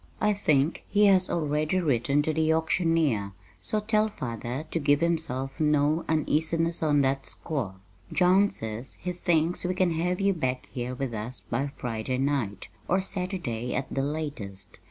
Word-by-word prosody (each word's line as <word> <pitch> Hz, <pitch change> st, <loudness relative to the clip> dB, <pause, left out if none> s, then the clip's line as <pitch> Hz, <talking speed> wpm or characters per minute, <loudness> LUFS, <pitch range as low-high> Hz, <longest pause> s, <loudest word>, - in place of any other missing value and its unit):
I 210 Hz, 0 st, +3 dB
think 155 Hz, -6 st, +1 dB
he 210 Hz, +1 st, +4 dB
has 190 Hz, -2 st, +4 dB
already 155 Hz, +2 st, 0 dB
written 140 Hz, -2 st, +2 dB
to 155 Hz, -, 0 dB
the 160 Hz, 0 st, +2 dB
auctioneer, 160 Hz, -, +1 dB, 0.3 s
so 215 Hz, -, 0 dB
tell 215 Hz, 0 st, +2 dB
father 125 Hz, -, -5 dB
to 165 Hz, -, 0 dB
give 145 Hz, -1 st, +3 dB
himself 135 Hz, -6 st, -1 dB
no 150 Hz, +1 st, +2 dB
uneasiness 160 Hz, +2 st, +1 dB
on 145 Hz, -2 st, +3 dB
that 135 Hz, 0 st, +1 dB
score. 130 Hz, -, -2 dB, 0.4 s
John 190 Hz, +3 st, +4 dB
says 110 Hz, -, -6 dB
he 180 Hz, -, -4 dB
thinks 175 Hz, -1 st, +1 dB
we 180 Hz, 0 st, -1 dB
can 185 Hz, -2 st, +2 dB
have 180 Hz, +3 st, 0 dB
you 195 Hz, 0 st, +3 dB
back 130 Hz, -6 st, -2 dB
here 125 Hz, 0 st, -3 dB
with 130 Hz, -2 st, -3 dB
us 110 Hz, +4 st, -5 dB
by 135 Hz, +4 st, -2 dB
Friday 120 Hz, +1 st, -2 dB
night, 130 Hz, -8 st, -1 dB, 0.2 s
or 185 Hz, -, +3 dB
Saturday 180 Hz, -, -2 dB
at 135 Hz, -, -3 dB
the 135 Hz, -, 0 dB
latest. 140 Hz, -10 st, -5 dB
150 Hz, 160 wpm, -27 LUFS, 130-175 Hz, 0.4 s, he